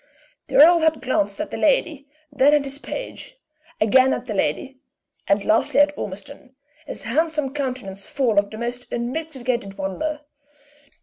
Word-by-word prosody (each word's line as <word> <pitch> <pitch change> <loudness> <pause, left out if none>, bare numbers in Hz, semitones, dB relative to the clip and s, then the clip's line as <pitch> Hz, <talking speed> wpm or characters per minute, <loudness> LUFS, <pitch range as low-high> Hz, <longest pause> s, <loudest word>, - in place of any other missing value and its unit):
The - - -6
earl 335 +4 +8
had 320 -1 +2
glanced 265 +4 -1
at - - -4
the - - -4
lady, 310 - +1 0.2
then 285 +1 +4
at 295 - +2
his 275 0 -6
page, - - -7 0.4
again 260 +5 +4
at 250 - -4
the 225 - -4
lady, 255 - -2 0.5
and 200 0 +2
lastly 225 +5 +2
at 290 0 +4
Ormiston, 255 +7 -8 0.3
his - - -6
handsome 300 +2 -1
countenance 250 -9 -4
full 240 -7 +2
of 200 0 -2
the 215 - -9
most 240 +2 -5
unmitigated 245 -5 -3
wonder. 295 +11 -3
265 Hz, 150 wpm, -22 LUFS, 225-295 Hz, 0.5 s, earl